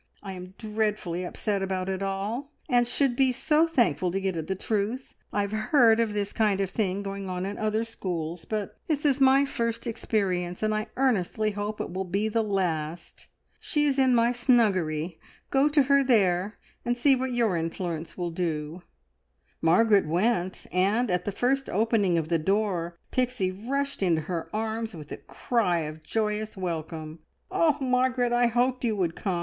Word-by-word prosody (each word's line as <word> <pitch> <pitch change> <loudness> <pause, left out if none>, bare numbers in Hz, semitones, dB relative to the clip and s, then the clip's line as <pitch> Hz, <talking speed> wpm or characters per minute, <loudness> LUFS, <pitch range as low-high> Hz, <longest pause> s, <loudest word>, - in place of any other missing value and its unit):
I 195 - -6
am 185 0 -10
dreadfully 210 -5 -2
upset 200 +2 -2
about 190 -1 -2
it 190 0 -2
all, 200 +8 -3 0.2
and 245 -3 +3
should 255 0 +1
be 265 0 +3
so 310 +5 +2
thankful 225 - +2
to 190 +3 -1
get 190 -2 -1
at 160 -1 -4
the 190 - -1
truth. 220 +6 -2 0.2
I 205 - +1
have 200 0 -2
heard 225 +1 +4
of 225 -2 +1
this 205 -1 -2
kind 210 -3 +2
of 195 -1 -1
thing 200 -2 -1
going 195 -1 -5
on 180 0 -3
in 200 +1 -5
other 215 +1 0
schools, 175 -7 -4
but 215 -3 -4
this 300 -2 -1
is 275 -1 +2
my 270 +1 +6
first 230 -3 -2
experience, 185 -6 -1
and 215 0 +2
I 215 0 -2
earnestly 215 -4 +1
hope 205 +1 -4
it - - -4
will 190 +1 -2
be 200 +4 -1
the 225 +1 +1
last. 175 -6 -3 0.3
She 295 -1 0
is 280 -2 +1
in 260 -2 +4
my 235 0 +4
snuggery. 185 - +1 0.3
Go 275 +2 +4
to 295 -1 +4
her 280 +1 +4
there, 200 -5 +2 0.3
and 240 0 0
see 270 +2 +4
what 260 0 -2
your 225 -6 +2
influence 165 0 -4
will 175 -2 -2
do!" 165 -1 -3 0.8
Margaret 200 +3 +4
went, 185 +2 0
and, 200 +5 +2
at 180 0 0
the 205 - -1
first 265 +6 0
opening 205 -4 +2
of 160 -2 -1
the 165 0 +1
door, 180 -2 0
Pixie 250 -7 0
rushed 275 +8 -3
into 170 -4 +2
her 165 +1 -4
arms 220 0 -3
with 150 -2 -10
a - - -4
cry 190 -9 0
of 155 0 -6
joyous 215 +3 -2
welcome. 160 -3 -5 0.3
"Oh, 330 -6 +3
Margaret, 250 -2 +1
I 240 0 +4
hoped 245 +2 +1
you 225 -3 +1
would 175 -4 -1
come! 185 -4 -2
210 Hz, 180 wpm, -27 LUFS, 180-240 Hz, 0.8 s, my